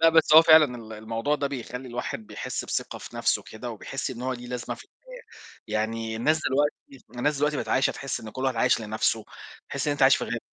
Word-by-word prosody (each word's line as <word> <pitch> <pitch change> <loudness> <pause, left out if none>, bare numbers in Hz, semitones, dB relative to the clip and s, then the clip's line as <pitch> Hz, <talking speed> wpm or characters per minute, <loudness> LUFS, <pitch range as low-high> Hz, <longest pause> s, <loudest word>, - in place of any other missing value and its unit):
لا 165 - +7
بس 160 -1 +5
هو 160 - +11
فعلًا 155 -6 +6
ال 110 -2 -10
الموضوع 115 +6 -2
ده 145 -1 -1
بيخلّي 130 -1 -6
الواحد 120 -2 -5
بيحس - - -5
بثقة - - -3
في - - -10
نَفْسه - - +1
كده، 120 +2 -8
وبيحس 135 +5 -5
إن 125 -1 -7
هو 130 +1 -1
ليه 125 -1 -7
لازمة 125 -1 -4
في - - -13
الحياة، - - -14 0.4
يعني 110 +1 -2
الناس 155 +7 +2
دلوقتي 140 -1 -1
الناس 145 +3 +1
دلوقتي 150 +1 +1
بقِت - - -4
عايشة، 130 +1 +3
تحس 135 -2 -4
إن 110 - -8
كلّ 130 +4 -5
واحد 130 -2 0
عايش 125 +1 +3
لنَفْسه، 110 0 0 0.4
تحس - - -3
إن 145 - +2
أنت 145 - -2
عايش 135 0 +7
في - - -3
غابة، 120 +1 -3
125 Hz, 230 wpm, -26 LUFS, 115-145 Hz, 0.4 s, هو